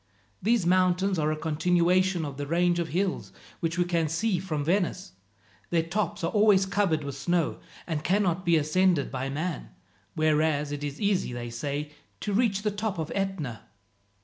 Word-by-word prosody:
These 225 Hz, -2 st, +2 dB
mountains 185 Hz, +1 st, +2 dB
are 155 Hz, 0 st, +1 dB
a -, -, 0 dB
continuation 175 Hz, +3 st, +2 dB
of 140 Hz, -2 st, -6 dB
the 145 Hz, 0 st, -4 dB
range 175 Hz, +2 st, +2 dB
of 170 Hz, -, -1 dB
hills 180 Hz, +4 st, -2 dB, 0.3 s
which 165 Hz, 0 st, -2 dB
we 175 Hz, -, +2 dB
can 170 Hz, -2 st, +1 dB
see 185 Hz, +4 st, 0 dB
from 160 Hz, -5 st, -3 dB
Venice. 185 Hz, +1 st, 0 dB, 0.6 s
Their 165 Hz, -1 st, +2 dB
tops 175 Hz, +1 st, -2 dB
are 165 Hz, -, 0 dB
always 205 Hz, -3 st, +4 dB
covered 190 Hz, -6 st, +1 dB
with 140 Hz, -1 st, -4 dB
snow, 165 Hz, +4 st, 0 dB, 0.3 s
and 155 Hz, -3 st, -3 dB
cannot 185 Hz, -1 st, +1 dB
be 170 Hz, -2 st, +4 dB
ascended 155 Hz, 0 st, +2 dB
by 130 Hz, 0 st, -3 dB
man; 155 Hz, +4 st, -3 dB, 0.5 s
whereas 155 Hz, -1 st, +2 dB
it 145 Hz, 0 st, -4 dB
is 145 Hz, 0 st, -4 dB
easy, 200 Hz, -, 0 dB
they 120 Hz, -1 st, -5 dB
say, 145 Hz, +4 st, -4 dB, 0.3 s
to 205 Hz, -, -2 dB
reach 205 Hz, -2 st, +1 dB
the 210 Hz, -, +1 dB
top 205 Hz, -1 st, -3 dB
of 160 Hz, -2 st, -3 dB
Etna." 190 Hz, -, -3 dB
170 Hz, 175 wpm, -27 LUFS, 150-190 Hz, 0.6 s, always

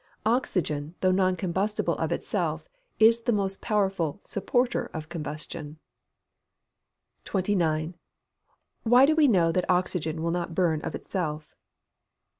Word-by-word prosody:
Oxygen, 180 Hz, -, 0 dB
though 185 Hz, -, +4 dB
non 185 Hz, 0 st, +2 dB
combustible 190 Hz, +3 st, -1 dB
of -, -, -1 dB
itself, -, -, -2 dB, 0.3 s
is 230 Hz, +1 st, +5 dB
the 235 Hz, -, 0 dB
most 195 Hz, -3 st, -1 dB
powerful 195 Hz, -7 st, 0 dB
supporter 245 Hz, +5 st, 0 dB
of 155 Hz, -1 st, -6 dB
combustion. 150 Hz, -2 st, -6 dB, 1.5 s
29. 175 Hz, -5 st, 0 dB, 0.9 s
_Why 245 Hz, +3 st, +6 dB
do 310 Hz, +2 st, +3 dB
we 310 Hz, -2 st, +5 dB
know 175 Hz, -8 st, +4 dB
that 180 Hz, +2 st, -1 dB
oxygen 175 Hz, -3 st, 0 dB
will 170 Hz, -, 0 dB
not 170 Hz, -1 st, -3 dB
burn 160 Hz, -4 st, +1 dB
of -, -, -4 dB
itself? 155 Hz, -5 st, -4 dB
185 Hz, 120 wpm, -27 LUFS, 160-205 Hz, 1.5 s, Why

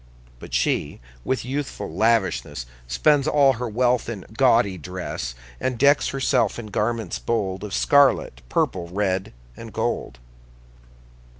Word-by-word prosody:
But -, -, -11 dB
she, -, -, 0 dB, 0.2 s
with 130 Hz, -2 st, -1 dB
youthful 130 Hz, -, -4 dB
lavishness, 105 Hz, -, +1 dB, 0.2 s
Spends 145 Hz, -, +3 dB
all 140 Hz, -3 st, +5 dB
her 125 Hz, 0 st, -4 dB
wealth 125 Hz, +2 st, +1 dB
in 105 Hz, -5 st, -6 dB
gaudy 115 Hz, -6 st, +4 dB
dress, 90 Hz, -9 st, -5 dB, 0.2 s
And 130 Hz, -2 st, -1 dB
decks 140 Hz, +3 st, +4 dB
herself 135 Hz, -1 st, +1 dB
in 110 Hz, -3 st, -7 dB
garments 110 Hz, -2 st, -1 dB
bold 100 Hz, -4 st, -2 dB
Of 105 Hz, -, -6 dB
scarlet, 140 Hz, -, +3 dB
purple, 85 Hz, +6 st, 0 dB
red, 95 Hz, +1 st, -1 dB, 0.2 s
and -, -, -10 dB
gold. -, -, -2 dB
115 Hz, 125 wpm, -23 LUFS, 95-130 Hz, 0.2 s, all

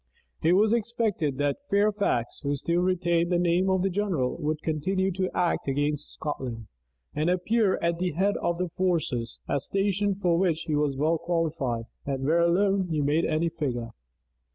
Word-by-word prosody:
It 165 Hz, +2 st, +4 dB
was 210 Hz, +4 st, +4 dB
expected 215 Hz, -, 0 dB
that 145 Hz, -, 0 dB
Fairfax, 200 Hz, -, +1 dB
who 145 Hz, 0 st, -1 dB
still 170 Hz, +5 st, 0 dB
retained 175 Hz, -1 st, +1 dB
the 175 Hz, -, +3 dB
name 175 Hz, +2 st, +2 dB
of 190 Hz, 0 st, +2 dB
general, 175 Hz, -10 st, 0 dB
would 155 Hz, -1 st, -2 dB
continue 190 Hz, +5 st, 0 dB
to 185 Hz, 0 st, -1 dB
act 175 Hz, -4 st, 0 dB
against 145 Hz, +2 st, -1 dB
Scotland, 125 Hz, -7 st, -5 dB, 0.5 s
and 155 Hz, +3 st, 0 dB
appear 190 Hz, +3 st, +2 dB
at 170 Hz, 0 st, +1 dB
the 180 Hz, -2 st, -1 dB
head 195 Hz, +5 st, +1 dB
of 170 Hz, -, -1 dB
the 180 Hz, 0 st, -2 dB
forces; 165 Hz, -10 st, -1 dB
a 140 Hz, -, +1 dB
station 200 Hz, +5 st, 0 dB
for 175 Hz, -3 st, +1 dB
which 170 Hz, -4 st, +1 dB
he 155 Hz, -, -1 dB
was 145 Hz, -2 st, 0 dB
well 155 Hz, +3 st, +1 dB
qualified, 155 Hz, -9 st, -1 dB, 0.2 s
and 135 Hz, -1 st, -3 dB
where 165 Hz, +4 st, +3 dB
alone 190 Hz, +2 st, +2 dB
he 160 Hz, -3 st, -1 dB
made 145 Hz, +3 st, +2 dB
any 160 Hz, +2 st, +1 dB
figure. 125 Hz, -8 st, -3 dB
170 Hz, 170 wpm, -27 LUFS, 150-190 Hz, 0.5 s, It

